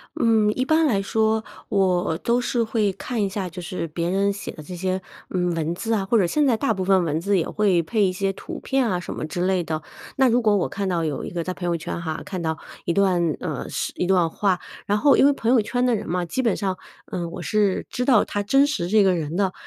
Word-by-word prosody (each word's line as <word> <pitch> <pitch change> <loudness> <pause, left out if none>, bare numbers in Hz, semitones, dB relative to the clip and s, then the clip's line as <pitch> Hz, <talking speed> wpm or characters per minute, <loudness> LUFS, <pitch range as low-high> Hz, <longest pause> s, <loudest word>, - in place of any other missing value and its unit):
嗯， 220 -2 +3
一 255 - -1
般 315 +2 +3
来 200 -6 +1
说 220 +2 +1 0.3
我 180 -4 +1
都 240 +1 +1
是 240 -1 0
会 220 -3 +1
看 225 +3 -3
一 195 - 0
下， 190 -2 -3
就 180 +1 -8
是 175 -1 -4
别 170 +2 -2
人 200 +1 +1
写 205 - -6
的 155 - -11
这 180 +3 -8
些， 185 +1 -2 0.3
嗯， 180 -2 0
文 165 +1 -1
字 225 +4 -2
啊， 200 -3 +1
或 230 +4 +2
者 190 - +4
现 295 - +2
在 240 -4 +3
大 275 - +1
部 185 - -3
分 190 -1 +3
文 155 +1 -1
字， 200 +1 +2
也 165 - 0
会 195 -5 +2
配 210 +5 +1
一 185 - +3
些 195 +1 -1
图 - - -8
片 265 -4 0
啊 180 -1 0
什 - - -6
么 - - -4
之 175 +3 -2
类 185 -2 +1
的。 155 -1 -3 0.4
那 265 -1 +5
如 245 +1 +3
果 210 -2 +3
我 180 - 0
看 195 -1 -3
到 170 -2 0
有 150 -3 -3
一 - - -5
个 170 -1 -3
在 185 - -3
朋 180 - -6
友 170 -1 +1
圈 170 +1 -5
哈， 160 -1 -4
看 185 -3 -5
到 160 -1 -1 0.3
一 - - +1
段， 185 -1 +2 0.2
呃， - - -4
是 - - -3
一 180 - -1
段 180 -3 +3
话， 190 0 0 0.3
然 205 +1 +2
后 280 +4 +5
因 - - +5
为 285 - +6
朋 235 -3 0
友 245 -4 +5
圈 245 +4 -1
的 245 -2 +3
人 205 - -5
嘛， 180 0 -1
基 215 +10 -2
本 230 -5 +1
上， 190 -2 -1 0.4
嗯， 170 -2 -3
我 - - -6
是 210 -3 +1
知 250 - -2
道 255 -1 +4
他 205 - -2
真 275 +7 +4
实 175 -12 -2
这 210 -1 +5
个 185 -2 +3
人 160 0 -3
的。 190 -2 +1
195 Hz, 285 characters per minute, -23 LUFS, 175-220 Hz, 0.4 s, 为